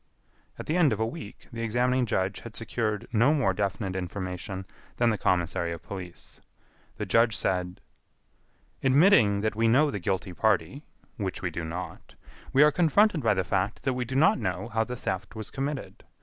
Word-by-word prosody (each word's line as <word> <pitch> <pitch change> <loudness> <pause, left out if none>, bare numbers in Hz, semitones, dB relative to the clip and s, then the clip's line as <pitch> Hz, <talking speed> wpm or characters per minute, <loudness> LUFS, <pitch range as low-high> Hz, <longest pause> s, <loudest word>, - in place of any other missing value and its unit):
At - - -7
the 160 - 0
end 160 -5 +4
of - - -4
a 110 - +2
week, 110 -1 -8
the 115 - -5
examining 125 +2 +1
judge 95 -1 -1
had 115 -2 -10
secured 110 -2 -2
no 120 +7 +4
more 120 -10 +2
definite 100 -1 -2
information 95 +1 -5 0.3
than 120 -1 +3
the - - +1
commissary 85 -1 0
of 85 0 -9
police. 90 -2 -9 0.6
The - - -3
judge 115 -2 +3
said: 90 -1 -2 1.0
"Admitting 135 - +5
that 110 0 -1
we 115 +1 +2
know 140 +6 +4
the 100 - -3
guilty 95 0 -2
party, 110 - 0 0.3
which 100 -4 -4
we 90 - -1
do 85 +1 -4
not, 85 +1 -7 0.4
we 140 - +6
are 150 - +6
confronted 180 +2 +3
by 110 -4 +2
the 95 - +1
fact 95 +4 -1
that 130 - +1
we 125 0 -2
do 130 +3 -5
not 160 +10 +4
know - - -3
how 110 0 +1
the 125 +2 -5
theft 95 -2 -4
was 110 -1 -6
committed. 140 0 -4
110 Hz, 185 wpm, -27 LUFS, 95-125 Hz, 1.0 s, we